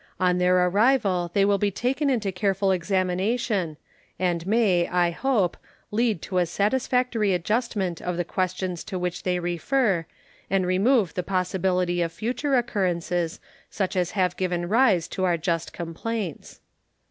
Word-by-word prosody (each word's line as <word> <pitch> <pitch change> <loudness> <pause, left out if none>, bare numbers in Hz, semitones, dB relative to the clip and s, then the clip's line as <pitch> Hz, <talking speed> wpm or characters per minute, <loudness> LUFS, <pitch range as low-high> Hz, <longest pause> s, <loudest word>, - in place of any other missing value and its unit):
On 180 -1 +2
their 180 0 +4
arrival 195 -3 +2
they 200 -1 +4
will 200 0 +2
be 205 - +2
taken 265 - -1
into 220 -7 0
careful 195 +1 +1
examination, 185 0 0 0.4
and 175 -1 -1
may, 195 -6 +3
I 175 -1 +2
hope, 215 -3 +1 0.4
lead 220 -5 0
to 185 -1 -1
a 175 - +2
satisfactory 225 +1 +1
adjustment 195 -2 -1
of 180 -1 -3
the 175 - -1
questions 185 -1 -2
to 185 - -4
which 180 -1 -3
they 180 -1 0
refer 175 - 0 0.4
and 195 -1 +1
remove 195 - +2
the 180 - -1
possibility 180 -1 0
of 165 -1 -1
future 250 - -1
occurrences 180 -8 -1 0.3
such 195 -1 -2
as 180 -2 +1
have 180 -2 +2
given 175 -2 -1
rise 210 -5 +3
to 185 - -3
our 175 -2 +2
just 165 0 -2
complaints. 175 +2 -5
185 Hz, 145 wpm, -25 LUFS, 175-215 Hz, 0.4 s, their